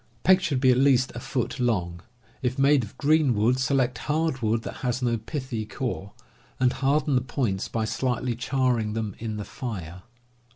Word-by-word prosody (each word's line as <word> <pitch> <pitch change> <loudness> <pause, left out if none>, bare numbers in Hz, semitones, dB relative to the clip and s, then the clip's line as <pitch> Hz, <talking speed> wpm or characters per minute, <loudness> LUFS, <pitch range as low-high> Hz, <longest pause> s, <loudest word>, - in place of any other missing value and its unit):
Pegs 190 +1 +5
should 155 -7 0
be 130 -1 +5
at 125 - +3
least 130 -2 +4
a - - -5
foot 125 +1 -3
long. 90 -8 0 0.4
If 130 0 -1
made 140 -1 +4
of 105 - -10
green 150 -4 +3
wood, 115 +5 +2
select 130 -2 +1
hard 155 -3 0
wood 110 0 +1
that - - -6
has 125 0 -2
no 120 -1 +2
pithy 130 -2 -4
core, 110 -4 -4 0.5
and 125 -1 +3
harden 140 +2 +1
the 125 - +3
points 120 -6 -2
by 115 -1 -2
slightly 125 +1 -1
charring 125 -3 0
them 110 -3 -3
in 110 -1 -4
the 105 - -5
fire. 95 - -6
125 Hz, 180 wpm, -26 LUFS, 110-135 Hz, 0.5 s, Pegs